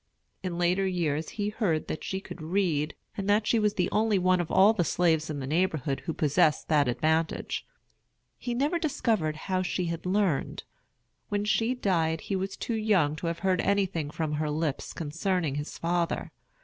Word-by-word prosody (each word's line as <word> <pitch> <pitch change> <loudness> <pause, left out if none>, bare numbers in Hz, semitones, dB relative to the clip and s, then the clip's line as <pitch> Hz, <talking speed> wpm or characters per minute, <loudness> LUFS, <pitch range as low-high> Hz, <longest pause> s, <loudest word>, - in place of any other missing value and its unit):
In 180 -2 -3
later 180 +2 +2
years 165 -4 -1
he 205 -1 0
heard 200 -8 0
that - - -4
she 190 - -2
could 190 - -10
read, 160 -3 0 0.2
and 200 0 -3
that 210 +1 +3
she 230 - +3
was 210 -1 +1
the 180 -1 +1
only 215 -1 +2
one 185 -1 +3
of 165 - -5
all 200 +3 +6
the 190 -5 +1
slaves 160 -1 +1
in 150 -2 -3
the 135 - -4
neighborhood 155 -3 0
who - - +1
possessed 150 0 +2
that 150 -4 +4
advantage. 160 +6 0 0.7
He 240 -1 -3
never 295 +7 +1
discovered 220 - 0
how 185 +4 -1
she 180 0 -1
had 170 +1 -4
learned. 185 -6 0 0.7
When 205 0 -1
she 225 +4 +1
died 165 -8 +1
he 195 - -3
was 190 +1 -3
too 235 - -3
young 205 -9 +2
to 170 - -4
have 165 0 -2
heard 185 -2 +3
anything 190 -7 0
from 155 0 -3
her 150 0 -1
lips 150 -1 -2
concerning 165 0 -1
his 145 +2 -5
father. 170 0 -1
175 Hz, 185 wpm, -28 LUFS, 155-200 Hz, 0.7 s, all